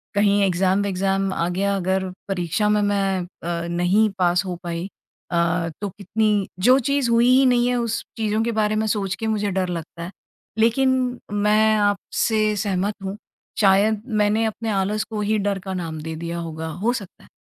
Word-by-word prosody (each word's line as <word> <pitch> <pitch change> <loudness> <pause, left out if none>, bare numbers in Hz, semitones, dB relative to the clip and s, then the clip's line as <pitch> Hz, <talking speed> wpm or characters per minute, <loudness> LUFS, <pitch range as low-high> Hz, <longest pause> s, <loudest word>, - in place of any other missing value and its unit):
कहीं 205 0 +3
एग्ज़ाम 190 +1 +2
विक्ज़ाम 195 0 0
आ 170 - -1
गया। 200 +3 0
अगर 190 0 0 0.2
परीक्षा 190 +2 -1
में 210 0 +3
मैं 200 -2 +1 0.2
अ, 170 0 -3
नहीं 180 +5 +2
पास 180 +1 +3
हो 180 -1 -3
पाई। 170 +1 -4 0.4
अ, 170 0 +1
तो 205 - -2
कितनी 205 +1 0
जो 250 +7 +5
चीज़ 280 -3 +1
हुई 235 +1 +4
ही 260 +1 +5
नहीं 245 -1 +3
है 250 - +1
उस 235 -1 -2
चीज़ों 215 -1 0
के 235 - 0
बारे 210 0 +1
में 215 +1 0
सोच 195 -3 -1
के 225 - -4
मुझे 210 -2 0
डर 185 -1 -1
लगता 170 0 -6
है। 175 - -6 0.5
लेक़िन 250 +2 +2
मैं 210 +1 +3
आपसे 210 +1 +1
सहमत 200 0 -1
हूँ। 195 +1 -4 0.4
शायद 205 +1 +4
मैंने 215 -1 +1
अपने 220 +1 -3
आलस 200 +2 0
को 215 -2 -3
ही 215 +1 +1
डर 200 -1 -1
का 190 -1 -4
नाम 165 -4 -4
दे 160 +1 -5
दिया 170 +1 -5
होगा। 160 -1 -5 0.2
हो 240 +2 +2
सकता 200 -7 -8
है। - - -18
200 Hz, 185 wpm, -22 LUFS, 185-215 Hz, 0.5 s, जो